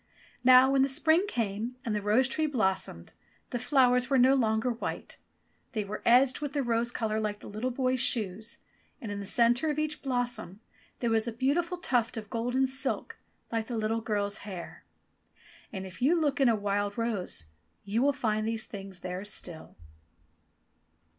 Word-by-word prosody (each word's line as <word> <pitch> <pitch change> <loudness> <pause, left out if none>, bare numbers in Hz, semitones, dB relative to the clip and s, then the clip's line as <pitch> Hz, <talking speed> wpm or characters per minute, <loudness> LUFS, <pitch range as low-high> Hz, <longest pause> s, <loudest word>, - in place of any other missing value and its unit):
Now 255 +1 +7
when 275 -1 +3
the 270 - +4
spring 315 +6 +3
came 225 - -2
and 225 - -1
the 210 - -1
rose 215 +6 +3
tree 310 +4 0
blossomed, 190 - -1 0.4
the 245 - -2
flowers 250 0 +3
were 275 - +3
no 260 +2 +6
longer 225 -2 +1
white. 235 - -5 0.6
They 215 -2 -1
were 205 +1 -6
edged 255 +3 +5
with 290 -1 -4
rose 240 -4 0
colour 220 -2 -1
like 210 -1 -2
the - - -12
little 215 +5 -3
boy's 255 0 0
shoes, 220 -3 0 0.4
and 220 - -6
in 205 - -4
the 200 - -5
centre 240 +7 +3
of 300 - -1
each 305 0 -1
blossom 245 -7 -2 0.4
there 235 -2 +1
was 225 +1 +2
a - - -1
beautiful 305 +10 0
tuft 245 -9 0
of 210 -2 -7
golden 245 +3 +1
silk 265 0 -1 0.3
like 225 -1 -2
the 240 - -3
little 220 +1 -1
girl's 205 -2 -1
hair. 190 -4 -9 0.9
And 190 -2 -5
if 185 +3 -11
you 325 +7 +4
look 290 -3 0
in 265 - +5
a 230 - +3
wild 205 0 -1
rose 200 - -1 0.4
you 215 +4 0
will 285 +2 +4
find 220 -6 -1
these 225 0 -1
things 195 -4 -9
there 180 +1 -5
still. 175 -5 -5
235 Hz, 175 wpm, -29 LUFS, 210-260 Hz, 0.9 s, Now